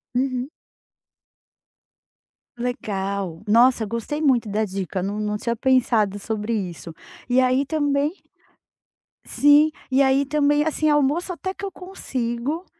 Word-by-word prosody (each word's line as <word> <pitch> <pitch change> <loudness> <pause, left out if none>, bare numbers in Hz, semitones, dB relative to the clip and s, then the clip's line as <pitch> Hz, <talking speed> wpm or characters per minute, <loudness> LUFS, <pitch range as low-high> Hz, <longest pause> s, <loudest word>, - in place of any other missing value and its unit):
Uhum. 255 +1 -1 2.1
Legal, 200 -7 -3
nossa, 235 +2 +4
gostei 230 +8 -4
muito 260 -7 +2
da 210 +1 0
dica, 190 -2 -3
não 200 +3 -3
não 210 0 -2
tinha 235 +2 -2
pensado 230 -5 +2
sobre 215 +2 -3
isso, 175 -5 -5 0.3
e 250 +1 +3
aí 255 +2 +2
também 290 0 0 1.1
sim, 290 +2 +5 0.2
e 265 +1 +4
aí 270 +1 +3
também 295 +1 +2
assim, 310 0 0
almoço 295 +5 +1
até 375 +2 -4
que 390 - -12
eu 395 - -3
consigo, 285 -4 -4
255 Hz, 120 wpm, -23 LUFS, 210-290 Hz, 2.1 s, sim